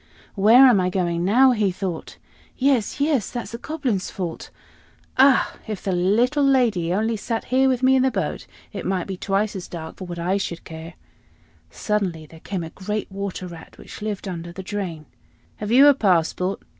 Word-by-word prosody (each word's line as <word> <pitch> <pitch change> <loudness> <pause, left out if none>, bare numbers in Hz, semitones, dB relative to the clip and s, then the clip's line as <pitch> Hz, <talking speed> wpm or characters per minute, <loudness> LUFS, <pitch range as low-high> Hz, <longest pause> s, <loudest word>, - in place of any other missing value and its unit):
"Where 225 +7 +7
am 245 -6 +6
I 180 0 +1
going 175 -2 -1
now?" 250 +8 +5
he 210 -5 +1
thought. 180 -2 -5 0.4
"Yes, 265 -3 +1
yes, 285 -7 +1
that's 240 -2 -6
the 230 - -6
Goblin's 260 -11 -2
fault. 175 -4 -5 0.7
Ah! 265 0 +4
if 215 -3 -5
the 195 - -1
little 225 +11 +2
lady 235 -11 +2
only 220 +4 0
sat 225 +2 -3
here 265 +1 +4
with 255 -1 -1
me 260 +1 +5
in 260 - +4
the 265 - +3
boat, - - -3 0.3
it - - -5
might 185 -2 -1
be 195 - -5
twice 200 +3 -1
as 185 - -6
dark 160 -2 -8
for 185 - -7
what 175 -1 -7
I 180 +3 0
should 170 -4 -4
care." 160 +1 -9 0.7
Suddenly 190 -7 -2
there 160 +1 -15
came 185 0 -4
a 160 - -8
great 210 +2 -4
Water 195 -1 -5
Rat, 170 -2 -11
which - - -11
lived 210 -1 -4
under 170 -2 -6
the 190 +2 -8
drain. 185 -6 -5 0.5
"Have 210 - -5
you 265 +4 +7
a 290 - +8
passport?" 185 -4 0
200 Hz, 190 wpm, -23 LUFS, 180-240 Hz, 0.7 s, a